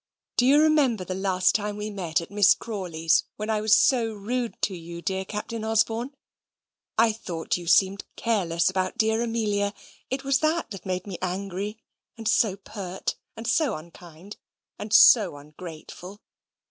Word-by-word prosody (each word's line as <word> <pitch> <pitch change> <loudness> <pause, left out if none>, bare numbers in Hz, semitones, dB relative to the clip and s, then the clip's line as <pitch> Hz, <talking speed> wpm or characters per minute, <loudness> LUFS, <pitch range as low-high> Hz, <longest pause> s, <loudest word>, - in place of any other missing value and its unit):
"Do 250 - +3
you 285 +2 +6
remember 290 -10 +3
the 185 - -4
last 185 -1 +1
time 210 -1 -2
we 210 +1 -4
met 175 -5 -1
at 170 - -10
Miss 205 -1 +5
Crawley's, 170 -7 0
when 215 +1 -3
I 215 -1 0
was 215 0 +5
so 235 -4 +3
rude 230 +3 -3
to 195 - 0
you, 170 0 -8
dear 190 +1 -2
Captain 215 +3 -5
Osborne? 225 +4 0 0.8
I 225 0 +5
thought 175 -7 -3
you 175 -1 -6
seemed 190 +3 +3
careless 175 -7 0
about 185 0 -1
dear 220 +1 +2
Amelia. 210 -3 -1 0.3
It 265 +1 -3
was 275 0 +2
that 310 - -1
made 185 0 -2
me 195 -4 -7
angry: 195 +3 -3 0.4
and 225 -1 -5
so 220 -3 +3
pert: 195 -2 -5 0.2
and 225 - -7
so 255 -1 +2
unkind: 170 +3 -12 0.4
and 210 0 -6
so 210 -7 +7
ungrateful. 165 +5 -10
205 Hz, 160 wpm, -25 LUFS, 185-225 Hz, 0.8 s, so